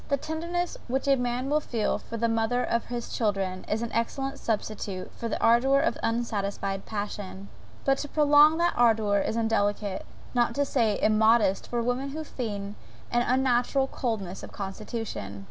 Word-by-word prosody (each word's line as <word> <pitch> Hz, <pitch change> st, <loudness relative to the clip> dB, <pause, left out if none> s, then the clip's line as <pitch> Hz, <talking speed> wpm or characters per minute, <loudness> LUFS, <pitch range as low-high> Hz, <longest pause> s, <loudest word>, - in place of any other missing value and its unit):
The 280 Hz, -, +2 dB
tenderness 340 Hz, +4 st, -3 dB
which 265 Hz, +3 st, -1 dB
a 275 Hz, -, +6 dB
man 245 Hz, 0 st, -1 dB
will 300 Hz, +2 st, +3 dB
feel 230 Hz, -8 st, -1 dB
for 230 Hz, -, -7 dB
the 230 Hz, +1 st, +1 dB
mother 225 Hz, +2 st, +1 dB
of 235 Hz, -, 0 dB
his 240 Hz, -1 st, -5 dB
children 195 Hz, -4 st, -1 dB
is 220 Hz, +2 st, 0 dB
an 235 Hz, -, -4 dB
excellent 270 Hz, +4 st, -2 dB
substitute 210 Hz, -4 st, -3 dB
for 230 Hz, -, -4 dB
the -, -, -2 dB
ardour 250 Hz, +4 st, +4 dB
of 320 Hz, -, +1 dB
unsatisfied 205 Hz, -4 st, -2 dB
passion; 205 Hz, -2 st, -5 dB, 0.4 s
but 270 Hz, 0 st, +3 dB
to 290 Hz, -, -3 dB
prolong 300 Hz, +1 st, +6 dB
that 345 Hz, +1 st, +2 dB
ardour 220 Hz, -4 st, +3 dB
it -, -, 0 dB
is 225 Hz, -, -2 dB
indelicate, 205 Hz, -3 st, 0 dB, 0.3 s
not 240 Hz, -1 st, +2 dB
to 285 Hz, 0 st, +2 dB
say 230 Hz, -6 st, +1 dB
immodest, 215 Hz, -2 st, +3 dB
for 240 Hz, -1 st, -1 dB
women 255 Hz, +3 st, -1 dB
to 315 Hz, -, -3 dB
feign 205 Hz, -8 st, -5 dB, 0.4 s
an 240 Hz, -, +3 dB
unnatural 255 Hz, +1 st, +2 dB
coldness 215 Hz, -8 st, -3 dB
of -, -, -9 dB
constitution. 200 Hz, -, -5 dB
230 Hz, 170 wpm, -27 LUFS, 210-265 Hz, 0.4 s, a